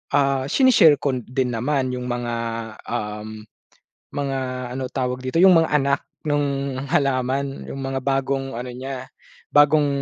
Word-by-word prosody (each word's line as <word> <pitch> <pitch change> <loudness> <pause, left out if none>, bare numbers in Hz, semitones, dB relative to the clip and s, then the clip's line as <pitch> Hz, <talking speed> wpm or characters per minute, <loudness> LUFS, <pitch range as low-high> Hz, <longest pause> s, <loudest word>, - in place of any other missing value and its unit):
ah, 135 -2 +2
sine-share 210 - +6
ko 140 -2 0
din 125 +1 -2
naman 130 +2 0
yung 125 0 -5
mga, 120 -1 -2 0.5
um, 110 -1 -5 0.7
mga, 140 -2 -1 0.4
ano 130 0 -3
tawag 125 -1 -2
dito, 130 +6 -1
yung 185 -3 +8
mga 160 - -2
anak 140 -1 +2 0.2
nung 140 -2 0 0.2
halaman. 135 0 0
Yung - - -6
mga 135 0 -2
bagong 135 0 -1
ano 125 - -5
niya, 130 +1 -6 0.5
bagong 145 0 +5
135 Hz, 140 wpm, -22 LUFS, 125-140 Hz, 0.7 s, yung